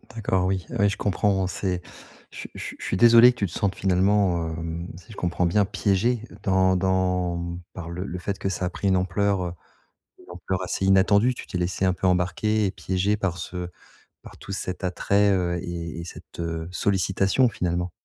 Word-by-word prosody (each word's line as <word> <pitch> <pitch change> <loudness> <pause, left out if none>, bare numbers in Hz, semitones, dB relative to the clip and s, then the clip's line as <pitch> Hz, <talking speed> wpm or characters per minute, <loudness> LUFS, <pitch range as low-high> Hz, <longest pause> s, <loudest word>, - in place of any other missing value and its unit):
D'accord, 95 -4 0
oui, 95 -3 -1
oui, 100 0 +2
je 105 - -3
comprends. 95 -1 +1
C'est 90 -1 -2 0.5
je - - -12
suis - - -7
je - - -7
suis - - -7
je - - -7
suis 95 - -1
désolé 120 +2 +8
que 120 - -22
tu 100 - +1
te 80 - -12
sentes 100 0 -1
finalement, 95 -2 +2
hem, 85 +1 -5
si 90 +4 -15
je 105 - -12
comprends 90 0 0
bien, 100 +4 +3
piégée 105 +4 +1 0.2
dans 95 -1 +3
dans, 90 -1 +1
mmh, 85 +1 -5
par 85 -2 -7
le 90 +2 -5
le 90 -2 -5
fait 100 +2 -3
que 95 - -1
ça 90 -1 -2
a - - -1
pris 100 +2 -3
une 95 - +4
ampleur, 95 +1 0
heu, 85 -1 -4 0.7
une - - -17
ampleur 95 +2 -3
assez 95 +1 -2
inattendue. 100 +5 +4
Tu - - -9
t'es 90 - -4
laissée 90 +2 -1
un 95 - +3
peu 95 - -1
embarquer 100 +4 +1
et 95 - 0
piéger 95 +2 -1
par 95 -4 -2
ce 90 +1 -5 0.5
par - - -13
tout 100 - -10
cet 95 -1 -4
attrait, 100 +2 +2
heu, 90 -2 0
et 85 -1 -5
et - - -5
cette, 85 - -12
heu, 85 -1 -3
sollicitation 95 +5 +2
finalement. 90 -3 -2
95 Hz, 210 wpm, -25 LUFS, 90-100 Hz, 0.7 s, désolé